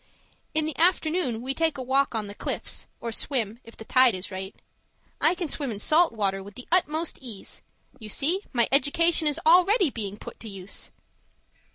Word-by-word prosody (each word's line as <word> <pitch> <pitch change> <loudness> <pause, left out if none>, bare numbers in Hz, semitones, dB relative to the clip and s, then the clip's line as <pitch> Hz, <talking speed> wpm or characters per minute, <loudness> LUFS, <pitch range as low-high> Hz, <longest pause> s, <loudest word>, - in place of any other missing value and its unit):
In 310 -1 +2
the 310 -2 -3
afternoon 320 -8 +2
we 265 +1 -2
take 320 0 0
a 260 - -4
walk 265 0 +1
on 215 -2 -1
the 200 - -8
cliffs, - - -3
or 230 - -4
swim, 225 -2 -2
if 230 - -15
the 220 - -10
tide 255 -3 +5
is 185 +2 -5
right. 190 +1 -6 0.7
I - - +4
can 350 -2 -3
swim 285 -2 -2
in 215 - -4
salt 315 +11 +4
water 195 -3 -1
with 200 +1 -12
the 250 - -9
utmost 335 -2 +1
ease 230 -7 -7 0.4
you 215 -2 -9
see 330 - +1
my 240 -3 +3
education 315 +4 +3
is 295 +1 +1
already 360 - +5
being 205 -4 -5
put - - -10
to 225 - -7
use! 195 -1 -5
260 Hz, 190 wpm, -26 LUFS, 215-320 Hz, 0.7 s, tide